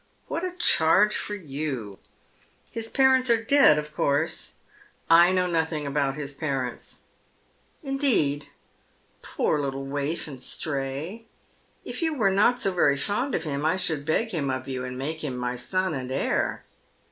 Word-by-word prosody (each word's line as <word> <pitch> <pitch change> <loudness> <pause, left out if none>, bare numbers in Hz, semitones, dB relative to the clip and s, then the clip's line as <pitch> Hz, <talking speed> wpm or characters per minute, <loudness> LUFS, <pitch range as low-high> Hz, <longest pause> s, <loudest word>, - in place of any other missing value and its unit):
*' - - -38
What 335 - -3
a 365 -1 -3
charge 210 - +4
for 210 - -2
j'ou! 135 - -5 0.7
His 225 0 -6
parents 260 -1 +3
are 230 -1 +3
dead, 270 - +5
of 150 0 -4
course?" 150 +4 0 0.3
" - - -24 0.3
I 170 +2 +7
know 185 -1 +2
nothing 160 -3 -1
about 140 -1 0
his 145 -2 -6
parents." 135 -4 -4 0.4
" - - -38
Indeed! 270 - +2 0.7
Poor 150 - 0
little 135 -1 -3
waif 145 +4 -3
and 135 -4 -9
stray. 145 - -4 0.6
If - - -6
you 320 -2 0
were 210 -7 +2
not 215 +6 +3
so 195 - +1
very 145 -6 +3
fond 225 - -1
of 160 - -2
him 145 -2 -3
I 160 +4 +2
should 160 -6 -1
beg 165 +10 0
him 150 -7 -1
of 130 0 -3
you, 130 -1 -4
and 125 0 -5
make 155 +4 -4
him 130 -4 -3
my 125 0 -2
son 185 +8 -1
and 130 -2 -4
heir." 130 - -1
155 Hz, 170 wpm, -26 LUFS, 140-205 Hz, 0.7 s, I